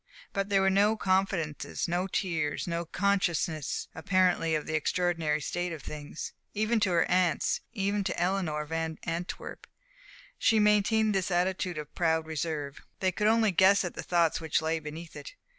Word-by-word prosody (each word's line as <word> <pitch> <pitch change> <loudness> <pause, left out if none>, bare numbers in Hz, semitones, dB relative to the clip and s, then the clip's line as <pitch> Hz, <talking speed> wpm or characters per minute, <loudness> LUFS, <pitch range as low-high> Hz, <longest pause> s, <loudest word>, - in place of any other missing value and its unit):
But 195 0 -1
there 195 -1 +3
were 195 - +4
no 205 +3 +3
confidences, 185 -7 0
no 175 +2 0
tears, 165 -6 -1
no 170 0 -2
consciousness 175 -5 0
apparently 180 -4 +2
of 155 - -2
the 160 - -4
extraordinary 160 -1 0
state 175 +4 -3
of 155 -4 -7
things. 150 +1 -7 0.2
Even 215 +2 +1
to 205 -3 +2
her 175 -2 +3
aunts, 180 -4 +1
even 200 -1 -1
to 175 - -2
Eleanor 175 -4 0
Van 160 0 -3
Antwerp, 170 +1 -5 0.7
she 225 - +4
maintained 210 +1 +3
this 190 -1 0
attitude 180 -1 0
of 150 -1 -7
proud 160 -2 +1
reserve. 155 -3 -4 0.2
They 185 -1 +1
could 210 +3 0
only 220 -1 +4
guess 190 +2 +5
at 175 - -4
the - - -5
thoughts 170 -2 +1
which 160 -1 +1
lay 160 +1 -1
beneath 160 +2 -8
it. - - -9
175 Hz, 165 wpm, -29 LUFS, 160-195 Hz, 0.7 s, guess